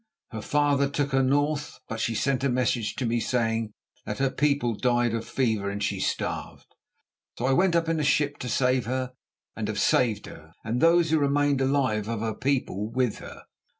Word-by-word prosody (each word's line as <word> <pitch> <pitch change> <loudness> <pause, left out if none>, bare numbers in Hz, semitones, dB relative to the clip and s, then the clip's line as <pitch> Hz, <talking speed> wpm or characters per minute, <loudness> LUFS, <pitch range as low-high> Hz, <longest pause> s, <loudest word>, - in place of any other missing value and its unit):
Her 110 -2 -5
father 140 +2 +2
took 140 0 -1
her 135 0 +3
north. 145 +2 0
But 115 - -5
she 115 0 -1
sent 135 +3 0
a 140 - +2
message 120 -3 0
to 130 - -2
me 120 +1 +1
saying 115 -2 0 0.3
that - - -5
her 135 -1 +1
people 140 -5 +1
died 120 0 +1
of 115 -1 -3
fever 110 -6 0
and 100 +1 -4
she 100 -2 -1
starved. - - -3 0.7
So 120 - -2
I 135 - +3
went 180 +4 +3
up 165 -1 +2
in 165 -1 0
a - - 0
ship 145 0 +1
to 125 - -4
save 125 -1 +1
her, 130 0 -2 0.4
and - - -3
have - - -2
saved 110 -5 +2
her, 80 0 -13
and 115 +3 -1
those 165 -1 +4
who 160 - +4
remained 145 -1 +2
alive 130 -6 +1
of 115 -1 -3
her 110 -1 -1
people 125 -5 -1
with 125 -2 -1
her." - - -11
130 Hz, 200 wpm, -26 LUFS, 115-140 Hz, 0.7 s, those